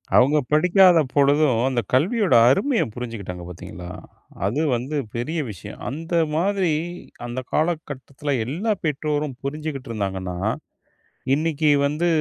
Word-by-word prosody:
அவங்க 140 +5 +5
படிக்காத 180 +2 +6
பொழுதும் 140 -3 +4
அந்த 125 -3 0
கல்வியோட 190 - +2 0.2
அருமைய 230 - +2
புரிஞ்சுக்கிட்டாங்க 105 -8 -6
பார்த்தீங்களா? 90 0 -9 0.6
அது 130 +10 0
வந்து 130 +6 -4 0.2
பெரிய 155 +8 -2
விஷயம். 95 - -10
அந்த 160 +5 -6 0.2
மாதிரி 185 0 +1 0.5
அந்த 120 +2 -4
காலகட்டத்துல 145 -3 -2
எல்லா 185 - -1
பெற்றோரும் 150 -2 -1
புரிஞ்சுகிட்டு 145 -2 -4
இருந்தாங்கன்னா, 95 -4 -3 1.0
இன்னைக்கு 155 0 +1 0.2
வந்து 150 +5 0
145 Hz, 110 wpm, -23 LUFS, 120-160 Hz, 1.0 s, படிக்காத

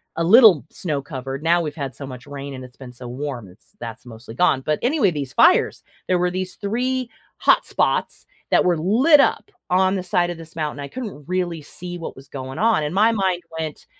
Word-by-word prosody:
a 165 - 0
little 210 - +7
snow 150 -6 -3
covered. 135 0 -6
Now 170 +1 +3
we've 150 -3 -4
had 135 -6 -5
so 140 - -8
much 130 -1 -9
rain, 140 -1 -7
and 130 -1 -8
it's 125 0 -16
been 130 -2 -10
so 125 0 -10
warm, 125 -3 -5
it's 90 - -21
that's 115 0 -8
mostly 115 -1 -11
gone. 135 -5 +3
But 150 +2 -1
anyway, 250 - +2
these 140 -5 -5
fires, - - +4 0.2
there 185 - +2
were 180 0 +1
these 185 0 -4
3 250 +4 -2 0.3
hot - - +4
spots - - -1 0.3
that - - +4
were 175 -2 +3
lit 240 - +5
up 400 - +1 0.2
on 185 +1 +3
the 185 - -3
side 175 -1 +1
of 175 - -7
this 165 0 -12
mountain. 150 -3 -3
I 140 - -5
couldn't 205 - -7
really 175 -3 -2
see 175 +4 -8
what 165 - -7
was 135 0 -14
going 130 -1 -7
on, 220 -7 +3
and 150 +2 -3
my 220 +3 +5
mind 190 -5 0 0.2
went, 155 - -5
165 Hz, 220 wpm, -22 LUFS, 135-185 Hz, 0.3 s, little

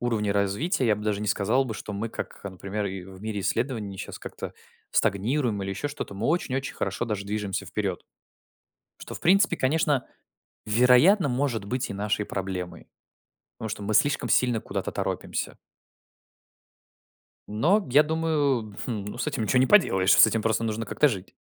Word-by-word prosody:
уровне 110 -4 0
развития. 100 - 0
Я 105 -2 +3
бы 105 - -7
даже 105 -1 0
не 105 - -2
сказал 115 +8 +2
бы, 115 -4 -5
что 105 - -7
мы 105 +3 -3
как, - - -7
э, 100 - -3
например, 100 +2 -4
и 95 -1 -5
в 95 0 -12
мире 110 -1 -3
исследований 110 -2 -2
щас - - -7
как-то - - -7 0.4
стагнируем 110 +1 +1
или 95 - -3
ещё 100 +9 -3
что-то, 140 -7 -6
мы 105 +4 -2
очень-очень 140 -5 -1
хорошо 100 +4 -2
даже 105 -4 -3
движемся 100 -1 -2
вперёд. 95 -1 -3 1.0
Что, - - -8
в - - -8
принципе, 190 0 +4
конечно, 145 -2 +1 0.6
вероятно, 125 - +5
может 125 -4 -1
быть 125 +5 -2
и - - -5
нашей 105 +1 -1
проблемой, 95 -2 -5 0.7
потому 110 - -4
что 105 -1 -5
мы 100 +2 -2
слишком 145 +6 +2
сильно 120 -3 +3
куда-то - - -4
торопимся. - - -3 1.9
Но 165 - +2
я 145 +4 +7
думаю, 145 -8 0
хм, 105 -5 -3
ну, 105 - -6
с 120 - -2
этим 115 - -1
ничего 125 +4 +2
не 130 - +4
поделаешь, 95 - +5
с - - +9
этим 110 0 0
просто 115 +1 0
нужно 110 0 -2
как-то 150 - +3
жить. 100 -8 -4
110 Hz, 175 wpm, -26 LUFS, 100-130 Hz, 1.9 s, с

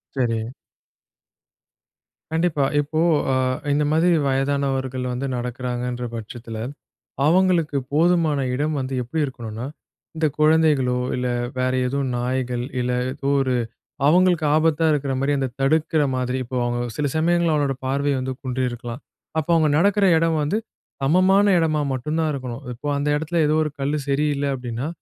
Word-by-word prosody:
சரி. 115 -4 0 1.9
கண்டிப்பா. 160 -3 +1 0.2
இப்போ 155 +2 -3 0.3
அ - - +2 0.4
இந்த 150 +1 +2
மாதிரி 170 +2 +3
வயதானவர்கள் 135 -1 -1
வந்து 130 +3 -3
நடக்கிறாங்கன்ற 125 0 -3
பட்சத்தில, 115 0 -7 0.7
அவுங்களுக்கு 170 -2 +3 0.2
போதுமான 165 -2 +3
இடம் 150 +3 -1
வந்து 130 0 -4
எப்பிடி 150 +6 -2
இருக்கணுனா, 120 -3 -6 0.5
இந்த 155 0 +2
குழந்தைகளோ! 150 -5 +3 0.2
இல்ல 125 0 -1 0.3
வேற 130 0 +1 0.2
ஏதோ 140 +2 -1 0.2
நாய்கள், 125 0 -2
இல்ல 125 0 0 0.2
ஏதோ 140 - -3
ஒரு 130 -2 0 0.5
அவுங்களுக்கு 175 0 +4
ஆபத்தா 160 0 +2
இருக்கிறமாரியா, 140 0 0
அந்த 135 -2 -1
தடுக்கிற 155 +2 +2
மாதிரி. 125 0 -1
இப்போ 125 +2 -4
அவுங்க 120 0 -1 0.2
சில 145 -1 0
சமயங்கள்ல 170 0 +2
அவளோட 140 -2 0
பார்வை 140 +2 0
வந்து 130 0 -3
குன்றியிருக்கலாம். 125 -1 -3 0.4
அப்போ, 160 +2 -5
அவுங்க 155 -2 +3
நடக்கிற 200 +2 +3
இடம் 165 -1 +2
வந்து 150 +9 0 0.5
சமமான 185 +7 +4
இடமா 160 -2 +1
மட்டுந்தான் 155 +5 -1
இருக்கணும். 130 -1 -5
இப்போ 130 +5 -8
அந்த 145 +1 -2
இடத்தில 160 +3 -2
ஏதோ 155 - +2
ஒரு 155 - -2
கல்லு 140 +2 0
சரி 140 +2 +2
இல்ல 140 +1 -2
அப்பிடின்னா, 125 +2 -4
140 Hz, 135 wpm, -22 LUFS, 125-155 Hz, 1.9 s, அவுங்களுக்கு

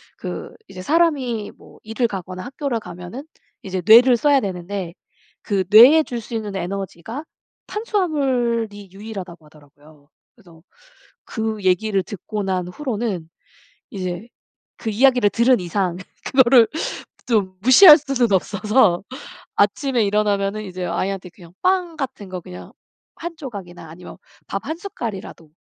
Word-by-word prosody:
그 - - -7 0.2
이제 185 - -9
사람이 270 - 0
뭐 - - -18
일을 225 +2 -1
가거나 185 -2 -7
학교를 265 -2 -3
가면은 180 - -9 0.4
이제 190 -1 -3
뇌를 240 +4 +8
써야 285 +2 +3
되는데 185 -3 -5 0.5
그 195 -3 -1
"뇌에 260 +9 +9
줄 240 -5 -5
수 230 - -8
있는 210 -3 -4
에너지가 195 - -5 0.4
탄수화물이 255 - -1
유일하다."고 195 -5 -8
하더라고요. 145 0 -21 0.3
그래서 170 -7 -19 0.7
그 220 -2 -3
얘기를 190 +2 +1
듣고 205 +3 -6
난 185 -2 -2
후로는 220 - -4 0.6
이제 185 +1 -5 0.5
그 225 - -4
이야기를 245 -1 +4
들은 240 +1 +3
이상 180 0 -1 0.3
그거를 250 -3 +5 0.6
좀 200 -6 0
무시할 295 - +9
수는 270 -6 0
없어서 200 0 +2 0.5
아침에 230 +3 +2
일어나면은 205 0 0
이제 185 -2 -6
아이한테 185 +2 -3
그냥 170 -1 -16
빵 365 -3 +1
같은 260 -8 -5
거 185 -1 -6
그냥 90 - -11 0.4
1 335 0 -7
조각이나 195 - -9
아니면 175 +3 -12 0.3
밥 195 - -4
1 315 +3 -3
숟갈이라도 220 - -7
210 Hz, 290 characters per minute, -21 LUFS, 185-255 Hz, 0.7 s, 뇌에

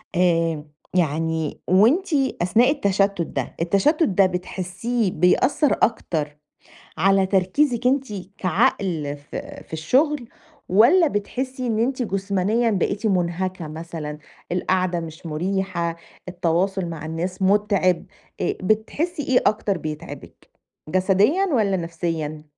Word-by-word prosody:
آآ، 165 -3 +2 0.3
يعني 160 -1 0
وأنتِ 250 - +3 0.3
أثناء 230 +9 +4
التشتُّت 200 - +1
ده، 165 - -4
التشتُّت 200 - +2
ده 195 - +4
بتحسيه 185 +4 -2
بيأثّر 255 - +2
أكتر 150 -9 -1 0.6
على 195 +3 +4
تركيزِك 235 +7 +1
أنتِ 265 -4 0 0.2
كعقل 180 - 0
في 285 +1 -7
في - - -19
الشغل، 255 - +1 0.4
والَّا 260 - +5
بتحسي 255 +3 -3
إن 220 -1 0
أنتِ 255 +2 0
جسمانيًا 200 +2 0
بقيتِ 200 +2 -1
منهكة 180 -2 -1
مثلًا، 155 -1 -6 0.3
القعدة 180 0 0
مش 165 +1 -9
مريحة، 170 +1 -2 0.3
التواصل 180 +2 0
مع 160 -2 -6
الناس 175 +4 -4
متعب 195 -2 +2 0.4
آآ، - - +1
بتحسي 290 - 0
إيه 260 -1 +2
أكتر 205 -2 +1
بيتعبِك؟ 155 -2 -8 0.4
جسديًا 195 - +3
والَّا 200 -5 +2
نفسيًا؟ 165 -3 -4
190 Hz, 110 wpm, -22 LUFS, 170-230 Hz, 0.6 s, والَّا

